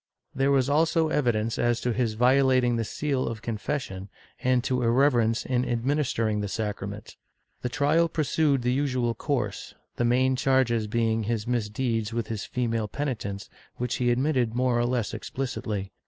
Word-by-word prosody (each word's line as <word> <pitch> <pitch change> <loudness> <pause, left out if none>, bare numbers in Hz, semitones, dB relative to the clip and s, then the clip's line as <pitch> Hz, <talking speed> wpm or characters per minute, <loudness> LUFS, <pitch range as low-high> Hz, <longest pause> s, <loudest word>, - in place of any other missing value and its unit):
There 135 +1 +1
was 135 -2 +3
also 160 +2 +2
evidence 115 -7 0
as 120 -1 +2
to 125 - 0
his 115 -2 0
violating 130 0 +3
the 115 - 0
seal 135 +3 -2
of 115 -1 -5
confession, 110 -4 -4 0.3
and 125 -1 +2
to 130 -1 0
irreve 130 +5 +4
rence 115 -1 +1
in 125 -1 +1
administering 120 -4 0
the 105 - -2
sacrament. 105 -1 -5 0.4
The 125 - -2
trial 150 +5 +2
pursued 150 -3 +1
the 125 +1 +1
usual 130 -4 0
course, - - -3 0.2
the - - +1
main 130 +2 +3
charges 125 -4 +2
being 115 0 0
his 110 -1 -1
misdeeds 115 -1 -1
with 115 -1 -2
his 110 -2 -3
female 115 -3 -1
peni 140 +3 -2
tents, 100 -2 -6 0.3
which 125 -1 -2
he 120 -1 +1
admitted 125 -2 +1
more 125 -1 +2
or 120 - +1
less 120 -3 -1
explicitly. 110 -7 -4
120 Hz, 165 wpm, -26 LUFS, 115-130 Hz, 0.4 s, irreve